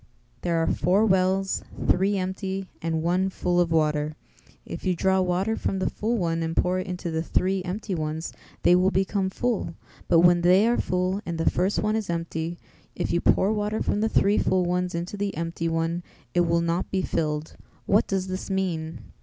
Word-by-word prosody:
There 170 -1 0
are 165 - +2
four 190 +7 +2
wells, 190 -1 +2 0.3
three 195 +2 +3
empty 190 +1 -3
and 160 -1 -1
one 180 +3 +1
full 180 -1 0
of 175 -2 +2
water; 150 -1 +1 0.5
if - - -7
you 185 -2 +1
draw 190 +2 +2
water 185 +4 0
from 195 - -2
the 190 - -1
full 230 +3 -1
one 165 -4 0
and 165 0 -3
pour 180 +1 +2
it 185 - -5
into 180 -2 -4
the 160 0 -1
three 185 +3 0
empty 195 +3 -4
ones 155 0 -3 0.3
they 175 - +6
will 185 +1 +4
become 195 0 0
full; 215 -6 -2 0.3
but 165 - +5
when 175 0 +5
they 185 +4 +5
are 240 +1 +2
full 185 +2 -1
and 170 -1 -4
the 165 - -1
first 185 +3 0
one 215 +1 +1
is 220 -4 -2
empty, 165 0 -3 0.4
if - - -2
you 170 - +1
pour 200 +3 +3
water 210 0 -1
from 205 - 0
the 220 - +2
three 205 -1 +3
full 185 -1 +2
ones 180 0 -1
into 175 +4 -4
the 200 -4 -2
empty 165 0 -2
one 165 +1 -1 0.3
it 175 -1 +3
will 170 0 +2
not 170 +1 -1
be 190 -1 -1
filled; 150 -2 -2 0.3
what 210 +3 +3
does 190 -1 -1
this 185 +1 -5
mean?" 165 - -2
180 Hz, 200 wpm, -25 LUFS, 165-195 Hz, 0.5 s, they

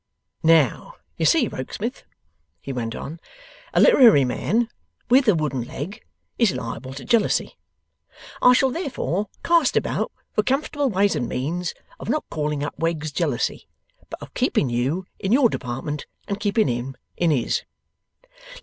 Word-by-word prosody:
'Now, 160 -6 +3 0.2
you - - +1
see, - - +4
Rokesmith,' - - -5 0.6
he 135 - -6
went 115 -2 -3
on, 160 +4 -7 0.5
'a - - +2
literary 230 - +7
man 225 - 0 0.4
WITH 260 0 +5
a 210 - +5
wooden 145 -5 -1
leg 175 - -7 0.4
is 230 -5 +4
liable 115 +3 -5
to 135 - -8
jealousy. 230 -3 +1 0.9
I 250 - +7
shall 260 +1 +3
therefore 245 - -2
cast 335 -5 +3
about - - -1 0.2
for - - +3
comfortable 275 +3 0
ways 200 -1 +2
and 120 - -2
means 170 +7 -2 0.2
of - - -7
not 305 - 0
calling 150 -2 -2
up 145 - -3
Wegg's 160 -2 -1
jealousy, 145 -6 -1 0.4
but - - -7
of - - -12
keeping 130 - +1
you 135 +10 -1
in 190 - -2
your 250 0 +5
department, 135 +4 -4 0.2
and 200 0 -3
keeping 215 +1 +2
him 125 +2 -3 0.2
in 170 - +1
his. 130 -7 +1
170 Hz, 150 wpm, -23 LUFS, -, 0.9 s, literary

